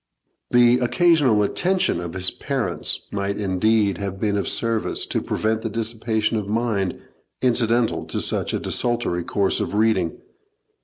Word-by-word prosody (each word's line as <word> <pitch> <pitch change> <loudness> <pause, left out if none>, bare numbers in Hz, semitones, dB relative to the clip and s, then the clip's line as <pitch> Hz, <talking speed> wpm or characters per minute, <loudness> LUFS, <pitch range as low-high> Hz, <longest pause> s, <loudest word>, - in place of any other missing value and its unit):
The 120 0 +5
occasional 135 - +3
attention 180 - 0
of 85 -1 -6
his 90 0 0
parents 115 - -2
might 100 0 -2
indeed 100 0 +1
have 100 -1 -4
been 105 -1 0
of 100 - -1
service 115 -2 0
to - - -2
prevent 110 0 -1
the 115 - -3
dissipation 110 0 0
of 105 -2 -3
mind 105 -3 -1 0.4
incidental 120 -1 +1
to - - -3
such - - 0
a - - -1
desultory 120 -8 -1
course 100 +2 0
of - - -3
reading. 105 -6 +1
110 Hz, 145 wpm, -22 LUFS, 100-120 Hz, 0.4 s, The